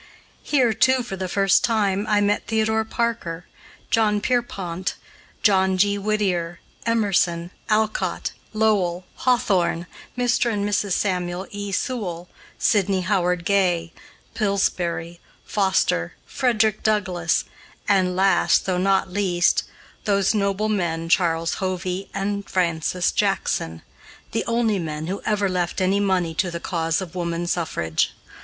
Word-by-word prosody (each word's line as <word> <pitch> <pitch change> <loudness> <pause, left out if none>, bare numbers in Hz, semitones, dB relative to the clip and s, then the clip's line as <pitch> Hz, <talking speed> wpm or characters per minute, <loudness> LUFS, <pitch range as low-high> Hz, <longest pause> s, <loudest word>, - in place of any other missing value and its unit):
Here, 255 -6 +2
too, 255 +3 +3
for 215 -5 -5
the 190 -1 -3
first 195 0 +3
time, 205 -3 +1
I 210 -1 +3
met 205 0 +1
Theodore 220 0 +1
Parker, 220 -7 -2 0.5
John 215 -2 +3
Pierpont, 195 -7 -2 0.5
John 190 -2 +4
G. 200 +2 +3
Whittier, 190 -5 -1 0.3
Emerson, 185 -6 +1 0.2
Alcott, 215 0 0 0.2
Lowell, 195 -5 +1
Hawthorne, 195 -9 +1 0.3
Mr. 245 -1 +2
and 205 -1 -1
Mrs. 205 -2 0
Samuel 180 -1 -1
E. 205 0 -5
Sewall, 190 -6 -3 0.3
Sidney 195 -3 +2
Howard 180 -2 0
Gay, 175 -4 +1 0.4
Pillsbury, 175 -5 -1 0.3
Foster, 190 - +1
Frederick 220 -5 +1
Douglass, 185 -6 +1 0.4
and 185 -3 +2
last 195 +1 +3
though 185 -2 0
not 190 0 +1
least, 180 -4 +2 0.4
those 200 -1 +2
noble 200 0 0
men, 170 -6 -1
Charles 165 -2 +2
Hovey 185 0 -3
and 200 0 -3
Francis 175 -1 0
Jackson, 80 0 -1 0.5
the 225 - -1
only 230 -3 +1
men 155 -2 -4
who 190 +4 -4
ever 205 -2 +2
left 180 -1 -1
any 190 +2 +2
money 185 -4 +1
to 180 +3 0
the 170 0 -5
cause 165 -1 -1
of 175 -3 -7
woman 170 -1 -2
suffrage. 120 - -1
190 Hz, 125 wpm, -23 LUFS, 175-210 Hz, 0.5 s, John